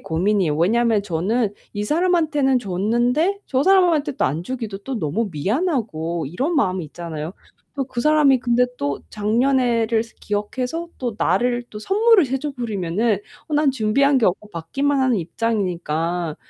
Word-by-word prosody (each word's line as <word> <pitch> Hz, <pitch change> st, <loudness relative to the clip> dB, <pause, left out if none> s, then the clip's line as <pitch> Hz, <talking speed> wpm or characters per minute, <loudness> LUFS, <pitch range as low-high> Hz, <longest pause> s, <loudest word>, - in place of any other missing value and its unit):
고민이에요. 175 Hz, -1 st, 0 dB
왜냐하면 220 Hz, +5 st, +2 dB
저는 205 Hz, +5 st, 0 dB, 0.2 s
이 205 Hz, 0 st, -3 dB
사람한테는 310 Hz, -4 st, +2 dB
줬는데 240 Hz, -, 0 dB
저 265 Hz, 0 st, +1 dB
사람한테 340 Hz, -5 st, +3 dB
또 -, -, -1 dB
안 150 Hz, +6 st, -1 dB
주기도 225 Hz, -3 st, -5 dB
또 250 Hz, +3 st, -5 dB
너무 185 Hz, +8 st, -1 dB
미안하고 180 Hz, -, -1 dB
이런 265 Hz, -, -2 dB
마음이 185 Hz, -, +1 dB
있잖아요. 160 Hz, 0 st, -6 dB, 0.6 s
그 250 Hz, -2 st, -3 dB
사람이 295 Hz, -1 st, +4 dB
근데 240 Hz, +1 st, +2 dB
또 140 Hz, 0 st, -2 dB
작년에를 230 Hz, +1 st, +1 dB, 0.2 s
기억해서 250 Hz, +11 st, -3 dB
또 240 Hz, -5 st, -4 dB
나를 245 Hz, 0 st, +1 dB
또 210 Hz, -, -8 dB
선물을 405 Hz, -, +4 dB
해 270 Hz, -, 0 dB
줘 295 Hz, +2 st, -4 dB
버리면 205 Hz, -8 st, -4 dB, 0.5 s
어 300 Hz, -, -2 dB
난 295 Hz, -2 st, +3 dB
준비한 265 Hz, +4 st, +2 dB
게 230 Hz, -, +3 dB
없고 205 Hz, +3 st, -2 dB
받기만 275 Hz, -, -1 dB
하는 260 Hz, -3 st, +2 dB
입장이니까 175 Hz, -4 st, -2 dB
230 Hz, 330 characters per minute, -21 LUFS, 185-275 Hz, 0.6 s, 사람이